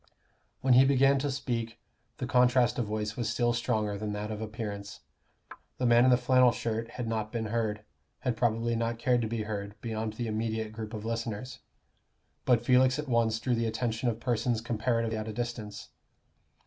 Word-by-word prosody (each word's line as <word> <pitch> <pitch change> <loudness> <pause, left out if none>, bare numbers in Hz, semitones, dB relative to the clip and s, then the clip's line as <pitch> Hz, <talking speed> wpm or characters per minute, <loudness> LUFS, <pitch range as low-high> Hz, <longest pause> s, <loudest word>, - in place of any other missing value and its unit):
When 130 -1 +4
he 130 +2 +8
began 135 0 +4
to 145 +1 -1
speak, 120 -4 -3 0.4
the - - -3
contrast 125 0 +3
of 115 - -1
voice 105 0 -3
was 120 -3 -2
still 120 +1 +1
stronger 105 -3 -1
than 105 0 -3
that 105 +1 -4
of 105 0 -5
appearance. 105 -2 -6 0.8
The 125 - -1
man 120 +1 +6
in - - +6
the 125 - +6
flannel 125 0 +5
shirt 115 0 -3
had 120 -2 -3
not 110 -1 -2
been 115 -2 -2
heard 110 -1 -2 0.4
had 125 -2 0
probably 115 0 +1
not 115 0 -1
cared 120 +1 +2
to 115 - -1
be 110 -1 -2
heard 105 0 -5
beyond 110 -1 -3
the 120 +2 -4
immediate 110 0 -2
group 110 0 -6
of 105 0 -6
listeners. 115 +2 -4 0.9
But 120 -2 +3
Felix 130 +1 +4
at 150 0 -4
once 115 -2 +2
drew 125 +2 0
the 115 -1 +1
attention 115 +2 -1
of 115 -1 -3
persons 120 0 0
comparatively 115 0 -1
at 110 - -5
a 110 - -4
distance. 110 -3 -5
115 Hz, 185 wpm, -29 LUFS, 110-125 Hz, 0.9 s, he